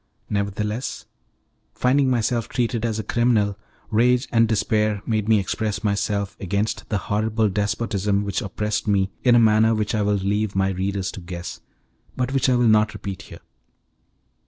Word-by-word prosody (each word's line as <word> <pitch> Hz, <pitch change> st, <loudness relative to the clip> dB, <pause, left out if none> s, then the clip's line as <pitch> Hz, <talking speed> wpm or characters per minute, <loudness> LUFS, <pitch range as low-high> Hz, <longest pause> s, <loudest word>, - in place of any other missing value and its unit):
Nevertheless, 105 Hz, +3 st, -2 dB, 0.7 s
finding 130 Hz, +2 st, +2 dB
myself 120 Hz, -1 st, 0 dB
treated 120 Hz, -1 st, -1 dB
as 110 Hz, -2 st, -2 dB
a 110 Hz, -, -3 dB
criminal, 110 Hz, -4 st, +1 dB, 0.4 s
rage 125 Hz, +4 st, +3 dB
and 115 Hz, -1 st, +4 dB
despair 105 Hz, -1 st, 0 dB
made 110 Hz, -2 st, -1 dB
me 110 Hz, -, +6 dB
express 100 Hz, +1 st, -2 dB
myself 100 Hz, -1 st, -1 dB
against 100 Hz, +3 st, -2 dB
the 105 Hz, -, 0 dB
horrible 110 Hz, +2 st, 0 dB
despotism 100 Hz, 0 st, -1 dB
which 100 Hz, -1 st, -2 dB
oppressed 105 Hz, +1 st, -3 dB
me 100 Hz, -1 st, +2 dB
in 125 Hz, -2 st, +5 dB
a -, -, +6 dB
manner 110 Hz, 0 st, +4 dB
which 105 Hz, -1 st, -1 dB
I 110 Hz, -, +1 dB
will 105 Hz, 0 st, +2 dB
leave 100 Hz, +1 st, -1 dB
my 95 Hz, 0 st, +2 dB
readers 95 Hz, 0 st, -2 dB
to 95 Hz, -, -9 dB
guess, 85 Hz, 0 st, -7 dB, 0.6 s
but 130 Hz, +1 st, -1 dB
which 135 Hz, -1 st, +2 dB
I 125 Hz, -, +3 dB
will 120 Hz, -1 st, +3 dB
not 110 Hz, -1 st, +3 dB
repeat 100 Hz, -2 st, -6 dB
here. -, -, -11 dB
105 Hz, 160 wpm, -23 LUFS, 100-115 Hz, 0.7 s, me